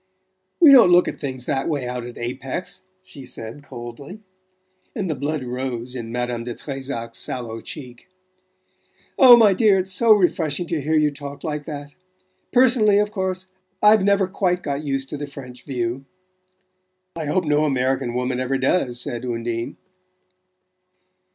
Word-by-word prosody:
"We 315 -5 +8
don't 255 -9 +8
look 175 0 +5
at - - -5
things 130 -3 -5
that 135 +3 -1
way 140 -5 -2
out 125 -1 -4
at 120 - -10
Apex," 130 +7 -5 0.2
she 140 -7 -11
said 120 +1 -7
coldly; 140 - -9 0.7
and 205 -6 -2
the 160 - 0
blood 145 +1 -3
rose 125 0 -4
in 115 -2 -6
Madame 120 -1 -2
de 120 -1 -5
Trezac's 135 -5 -6
sallow 115 -3 -4
cheek. 125 -3 -10 1.1
"Oh, 250 -3 +10
my 215 -4 +6
dear, 200 0 +4
it's 190 0 -2
so 230 +4 +3
refreshing 175 -5 +2
to 165 -3 -1
hear 155 +3 0
you 150 -1 +3
talk 140 0 -9
like 150 -3 -4
that! 145 -2 -7 0.6
Personally, 240 -5 +4
of 210 0 +1
course, 185 -2 -3 0.4
I've 210 -1 +6
never 200 -1 +3
quite 180 -2 -1
got 140 0 -2
used 135 -2 -2
to 150 - -4
the 145 0 -5
French 125 -3 -11
view 125 -1 -3 0.5
" 185 0 -49
"I 165 -2 -4
hope 180 +5 +1
no 150 0 +2
American 130 -3 0
woman 125 0 -1
ever 130 +1 0
does," 130 -2 0
said 120 -3 -4
Undine. 115 -1 -3
145 Hz, 160 wpm, -22 LUFS, 125-185 Hz, 1.1 s, Oh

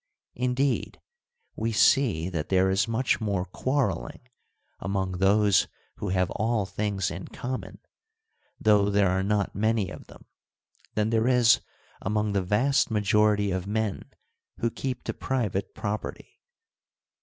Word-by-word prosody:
Indeed, 125 +2 -1 0.6
we 115 - -1
see 110 - +3
that 85 -5 -4
there 95 0 +3
is 95 +3 +2
much 115 +2 0
more 100 -4 -1
quarrelling 130 - -2 0.6
among 95 -2 -2
those 100 0 +4 0.3
who - - -4
have 90 -1 +1
all 110 -1 0
things 100 -2 -2
in 90 +2 -6
common, 130 0 -6 0.8
though 105 -2 +4
there 100 -2 +3
are 95 +1 +1
not 100 +1 0
many 110 -1 0
of - - -10
them, - - -15 0.7
than 105 +1 +1
there 115 +1 +2
is 125 -3 +5 0.4
among 105 +1 0
the 100 - +2
vast 115 +10 +2
majority 105 -1 +2
of 95 0 -3
men 110 -1 -2 0.5
who 115 - -1
keep 130 0 -4
to - - -3
private 110 -7 -2
property. 105 +1 -5
105 Hz, 130 wpm, -27 LUFS, 95-115 Hz, 0.8 s, is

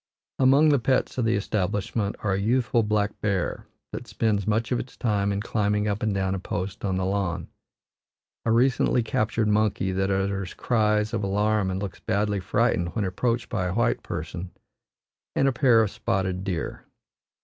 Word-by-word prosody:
Among 135 +4 +5
the 145 -2 +4
pets 130 +1 0
of 120 - +1
the 115 +1 +2
establishment 100 +1 -1
are 100 -3 +1
a 95 - 0
youthful 120 +2 +2
black 105 -1 -1
bear 100 -4 -1 0.2
that - - -6
spends 105 -3 0
much 110 +3 0
of 125 - +1
its 125 - -8
time 100 -3 +1
in 100 0 -1
climbing 105 -1 0
up 100 0 -1
and 110 - +1
down 95 -1 0
a 95 - -2
post 95 +2 -4
on 95 -2 0
the 95 - 0
lawn, 95 -4 -2 0.9
a 115 - +1
recently 125 0 +3
captured 110 0 0
monkey 105 -2 +1
that 95 +1 0
utters 95 -1 -1
cries 105 -2 +1
of - - -1
alarm 105 0 +1
and 95 0 -2
looks 100 - -6
badly 105 0 0
frightened 85 -1 0
when 110 -3 0
approached 115 +6 -1
by 95 -6 -1
a 90 - -3
white 120 0 +1
person, 85 +3 -5 0.9
and 135 - +3
a - - +4
pair 125 -3 +5
of 105 - -2
spotted 95 -1 -1
deer. 90 -5 -3
105 Hz, 180 wpm, -25 LUFS, 95-115 Hz, 0.9 s, Among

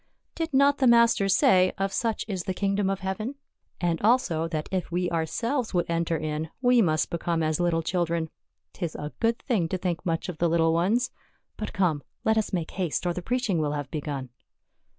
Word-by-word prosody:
" - - -50
Did 325 - -1
not 280 +1 +4
the 260 - +4
Master 235 -4 +5
say, 185 -1 +5
' - - -40
Of 195 0 -1
such 225 -2 -1
is 190 -5 -3
the 185 - -2
kingdom 200 0 0
of 195 -1 -2
heaven 215 +8 -3 0.2
?' - - -48
And 170 -2 0
also, 210 -8 +2
that 155 -2 -3
if 185 -2 -2
we 175 0 0
ourselves 225 - -1
would 175 - +2
enter 170 0 0
in 155 +1 -3
we 245 -1 +4
must 155 -5 +1
become 170 -1 -1
as 155 +1 0
little 170 -2 +1
children. 170 -2 -1 0.4
'Tis 170 -4 -4
a 150 +1 -5
good 230 0 +2
thing 210 -11 +1
to 185 - -1
think 175 -2 -2
much 165 -3 -1
of 175 -4 -6
the 170 - +2
little 165 0 +3
ones. 205 +9 +1 0.4
But 215 - -5
come, 175 -7 +1 0.2
let 220 - +4
us 220 -1 0
make 175 -5 -2
haste 180 -3 -2
or 175 - +1
the 180 - -4
preaching 235 -3 0
will 150 -1 0
have 145 -1 -4
begun." 145 -4 -4
180 Hz, 210 wpm, -26 LUFS, 165-215 Hz, 0.4 s, Master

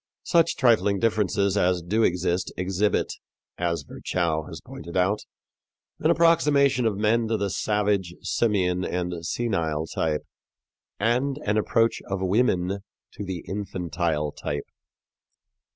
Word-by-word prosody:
Such 170 -1 +3
trifling 110 -5 +3
differences 100 -2 +1
as 90 -3 +2
do 105 +7 +1
exist 90 -2 +1
exhibit, 95 +3 0 0.5
as 85 -3 -1
Virchow 80 -1 -2
has - - -8
pointed 85 +3 -8
out, 95 +4 +2 0.8
an - - +2
approximation 145 -7 +4
of 105 -3 -1
men 110 +2 +2
to 110 0 0
the 100 -2 -1
savage, 100 -4 0
simian 95 -5 +1
and 90 -2 -3
senile 80 -7 -1
type, 80 -1 -1 0.8
and 125 +6 +1
an 105 - +1
approach 115 +2 +2
of 95 -1 -1
women 95 -1 +1 0.3
to 105 - -7
the 95 -3 -5
infantile 85 -6 -2
type. 70 0 -4
95 Hz, 120 wpm, -25 LUFS, 90-110 Hz, 0.8 s, approximation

